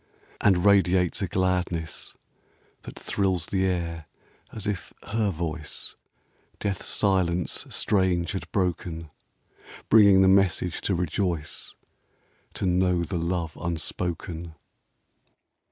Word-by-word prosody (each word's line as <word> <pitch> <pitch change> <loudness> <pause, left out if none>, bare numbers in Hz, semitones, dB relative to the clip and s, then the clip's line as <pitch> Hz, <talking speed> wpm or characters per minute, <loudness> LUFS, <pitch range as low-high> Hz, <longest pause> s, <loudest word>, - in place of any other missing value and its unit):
And 95 -3 +4
radiates 95 -3 +4
a 100 - 0
gladness 90 -2 -1 0.7
That - - -10
thrills 95 -5 0
the 95 -1 0
air 85 -3 -2 0.4
as 110 -2 -7
\iher 105 +2 -2
voice 80 -2 -4 0.6
Death's 100 -3 -2
silence 90 -4 +1
strange 95 -4 +1
had 95 - -5
broken, 85 -4 -2 0.3
— - - -19
Bringing 100 -3 +7
the - - +5
message 95 -2 +3
to 95 - 0
rejoice. 85 -2 -2 0.8
To - - -2
know 90 -1 +2
the 85 +1 -2
love 85 -2 -2
unspoken. 85 0 -3
90 Hz, 105 wpm, -26 LUFS, 85-95 Hz, 0.8 s, Bringing